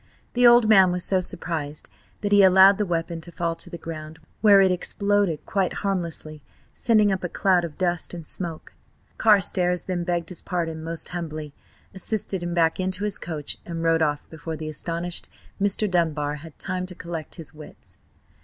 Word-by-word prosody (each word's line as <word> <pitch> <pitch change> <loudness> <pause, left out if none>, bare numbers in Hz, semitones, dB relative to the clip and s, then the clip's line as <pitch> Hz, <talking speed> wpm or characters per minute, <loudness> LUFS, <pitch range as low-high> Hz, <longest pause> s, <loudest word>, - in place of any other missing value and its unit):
The 245 0 +5
old 240 -1 +7
man 190 -4 +6
was 180 0 -1
so 190 -1 +2
surprised 155 -4 -4 0.3
that 205 - -2
he 205 0 +7
allowed 190 +1 +7
the 210 - 0
weapon 165 -1 -2
to 175 - -6
fall 170 0 -2
to - - -5
the 170 - -7
ground, 160 -1 -8 0.2
where 205 -2 +7
it 190 -1 +5
exploded 200 -2 0
quite 190 -2 0
harmlessly, 165 -5 -2 0.3
sending 215 -3 +3
up 190 -1 -2
a 175 - -2
cloud 185 -1 +2
of 165 -3 -6
dust 175 -2 -1
and 170 -2 -8
smoke. 165 -1 -5 0.5
Carstares 185 -4 +3
then 180 -2 -2
begged 170 -1 -2
his 180 - -7
pardon 165 -3 -3
most 165 0 -3
humbly, 155 -4 -5 0.4
assisted 195 -1 -1
him 175 0 -3
back 165 0 +2
into 185 +1 -1
his 210 -1 -1
coach, 155 -4 -5
and 165 -1 -5
rode 165 0 +3
off 150 -2 0
before 160 0 -6
the 155 0 -5
astonished 170 +3 -3 0.3
Mr. 200 +1 +1
Dunbar 155 -5 0
had 160 0 -12
time 185 -1 -3
to 180 - -8
collect 170 -3 -7
his 165 -3 -6
wits. 155 0 -13
175 Hz, 180 wpm, -24 LUFS, 160-190 Hz, 0.5 s, old